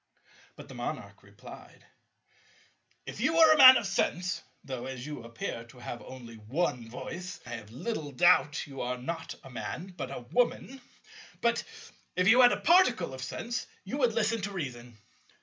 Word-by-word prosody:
But - - -12
the - - -11
Monarch - - -6
replied, - - -14 1.2
"If - - -8
you 325 - +2
were 320 -1 +8
a - - +1
Man 260 -1 +11
of - - -2
sense—though, 180 -9 -3
as 130 -1 -6
you 150 -3 -6
appear 115 0 -6
to 120 +2 -17
have 120 -1 -7
only 120 -3 -11
one 120 +1 -2
voice 180 +9 -7
I 125 - -9
have 115 -3 -7
little 145 - -4
doubt 160 0 +3
you 135 -3 -8
are 125 +1 -2
not 165 +6 -5
a 135 - -12
Man 180 +8 -6
but 130 - -5
a 135 - -6
Woman—but, 245 -1 -2 0.5
if 180 +1 +2
you 245 +5 +7
had 245 -1 +8
a - - -1
particle 250 - +4
of 130 - -7
sense, 230 - -4 0.2
you 195 +9 -5
would 245 -4 +2
listen 225 0 0
to 200 - -3
reason. 125 - -6
165 Hz, 165 wpm, -29 LUFS, -, 1.2 s, Man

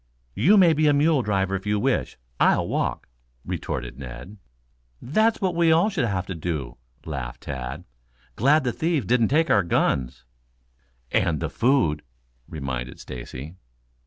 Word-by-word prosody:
"You 205 - +4
may 175 -4 +6
be 155 0 +2
a 145 - +5
mule 145 0 +3
driver 95 -3 0
if 95 +2 -5
you 105 0 +1
wish 130 +3 -1 0.2
I'll - - +3
walk," - - -2 0.4
retorted - - -4
Ned. 65 - -9 0.6
"That's 215 - +1
what 185 -3 0
we 170 -1 +3
all 170 +7 +3
shall 145 - 0
have 95 -3 -2
to 95 - -5
do," 80 -5 -4 0.3
laughed 65 -6 -6
Tad. 65 -3 -6 0.5
"Glad 145 +5 +3
the 125 -2 -1
thieves 160 - 0
didn't 115 +2 +3
take 160 +4 +2
our 100 - +5
guns." 65 -8 -1 0.9
"And 80 -3 +1
the - - -3
food," 115 - +2 0.5
reminded 65 -4 -5
Stacy. 65 +7 -8
105 Hz, 150 wpm, -24 LUFS, -, 0.9 s, may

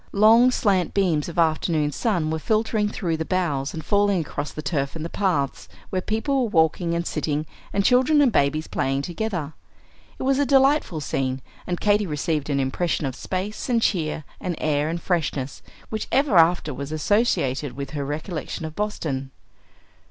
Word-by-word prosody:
Long, 225 +5 +6
slant 195 -8 +1
beams 175 -6 +1
of 170 - -9
afternoon 160 -2 +2
sun 170 - 0
were 160 - -1
filtering 215 +2 +1
through 170 -6 -2
the 160 - -1
boughs 155 -6 -1
and 160 -1 -7
falling 205 -2 +3
across 145 -2 -4
the 155 - -7
turf 140 -1 -1
and 160 -1 -5
the 170 - -6
paths, 175 -9 -1 0.2
where 185 - 0
people 260 +8 0
were - - -3
walking 170 -1 +2
and 170 0 -1
sitting, 150 -1 -1 0.3
and 200 0 0
children 260 +4 +4
and 275 -4 +5
babies 155 -3 +1
playing 135 +1 -1
together. 175 -4 -3 0.6
It - - -5
was 270 +1 +2
a - - +4
delightful 270 - +3
scene; 130 -2 -1 0.3
and 175 -1 -2
Katy 210 -1 +2
received 150 -1 -2
an 140 -1 +1
impression 145 +4 -1
of 130 -2 -3
space 190 - -4
and 240 -2 +3
cheer 160 -7 0 0.2
and 180 -2 -3
air 150 0 0
and 170 +1 -2
freshness, 145 -7 -2 0.3
which 220 - -3
ever 275 -6 +2
after 165 -2 +4
was 140 +3 -6
associated 155 - +1
with 140 +1 -6
her 145 -2 -3
recollection 155 +2 -4
of 155 0 -7
Boston. 155 -10 -3
170 Hz, 175 wpm, -24 LUFS, 150-205 Hz, 0.6 s, Long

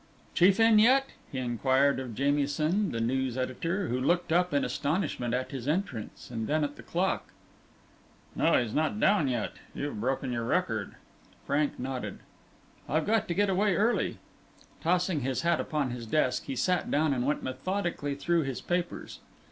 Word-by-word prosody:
"Chief 190 +4 +5
in 225 -1 +6
yet?" 265 +5 +4 0.2
he 135 - -5
inquired 130 +3 +2
of 125 -4 -6
Jamieson, 145 - +1
the 115 - -2
news 130 +2 0
editor, 165 +9 -2
who 125 +2 -1
looked 175 +5 +1
up 180 +1 +3
in 140 - +2
astonishment 145 -6 -1
at 130 +1 -3
his 135 -2 -5
entrance, 150 - -3
and 110 -2 -3
then 155 +1 +1
at 145 0 -2
the - - -11
clock. 185 +3 -1 1.1
"No, - - +4
he's 120 -3 -2
not 155 +7 0
down 195 -9 +3
yet. 120 -4 -1 0.2
You've 140 -7 -4
broken 130 +1 -1
your 120 -1 -2
record." - - -1 0.5
Frank 145 +1 0
nodded. 130 0 -4 0.7
"I've 155 +2 +1
got 220 0 +2
to 170 - -2
get 205 +1 +3
away 195 0 +2
early." 220 +6 +1 0.6
Tossing 180 -1 +1
his 130 +3 -2
hat 170 -1 +2
upon 145 -5 -1
his 120 -2 -6
desk, 125 -1 +1
he 135 - -4
sat 180 +7 +1
down 150 0 +2
and 125 -2 -1
went 145 +3 0
methodically 145 +1 -2
through 170 +4 +1
his 135 -4 -3
papers. 175 0 -3
145 Hz, 170 wpm, -29 LUFS, 130-180 Hz, 1.1 s, in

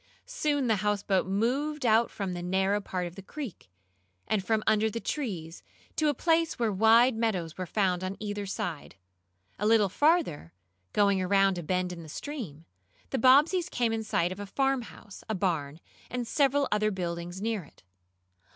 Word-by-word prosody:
Soon 290 -3 0
the 220 -3 +2
houseboat 200 -2 0
moved 255 +9 0
out 225 +1 +4
from 195 -3 -4
the 175 - -5
narrow 190 +3 +1
part 185 -2 -3
of 175 - -7
the 195 - -9
creek, 240 - -8 0.6
and 210 -3 0
from 220 +1 0
under 220 0 +3
the 230 - -4
trees, 185 - -4 0.3
to 310 - +1
a - - +2
place 330 +2 +1
where 230 -3 +1
wide 225 +5 +5
meadows 190 -8 -1
were 185 -1 -5
found 185 -2 0
on 185 +1 -4
either 205 -1 -4
side. 170 -5 -5 0.6
A 210 - +1
little 215 -3 +4
farther, 290 - +1 0.4
going 200 -2 +3
around 195 0 +3
a - - -4
bend 180 +2 -1
in 170 - -8
the 160 - -11
stream, 180 - -7 0.5
the 265 - 0
Bobbseys 300 +9 +5
came 235 -2 0
in 225 0 -2
sight 175 -5 0
of 185 - -6
a 205 - -6
farmhouse, 255 -4 -3
a 220 - 0
barn 165 -6 -1 0.3
and 245 -2 -3
several 280 +1 +2
other 215 0 +2
buildings 175 -2 -4
near 220 -2 -2
it. 145 - -21
210 Hz, 175 wpm, -29 LUFS, 185-240 Hz, 0.6 s, wide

